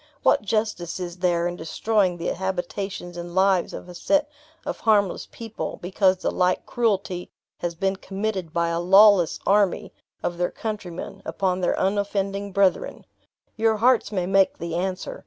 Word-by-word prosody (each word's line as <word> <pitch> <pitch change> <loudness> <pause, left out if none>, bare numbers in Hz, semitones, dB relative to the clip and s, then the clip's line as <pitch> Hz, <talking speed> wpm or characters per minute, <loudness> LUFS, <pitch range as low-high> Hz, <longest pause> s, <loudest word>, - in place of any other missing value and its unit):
What - - +4
justice 210 -5 -2
is 175 -1 -5
there 175 -1 +1
in 175 0 -2
destroying 185 +2 0
the 170 - -6
habitations 190 -1 -4
and 175 0 -7
lives 190 -2 +3
of - - -8
a 180 - -10
set 295 - +1 0.4
of 290 - -4
harmless 205 -4 +2
people, 225 -2 -6
because 185 +1 +2
the - - -2
like 180 0 +1
cruelty 195 -6 -1 0.3
has 170 -1 -3
been 195 +3 -1
committed 195 -3 -3
by 170 0 0
a 170 0 -1
lawless 195 0 +6
army 200 -1 +2 0.3
of 175 0 -2
their 175 - +1
countrymen, 205 -6 -6
upon 185 -2 -1
our - - +1
unoffending 200 0 -1
brethren? 190 -1 +1 0.5
Your 220 -1 +2
hearts 245 +1 +3
may 185 -4 -1
make 195 +1 +3
the 170 0 -5
answer. 185 +2 -3
190 Hz, 155 wpm, -24 LUFS, 175-205 Hz, 0.5 s, lawless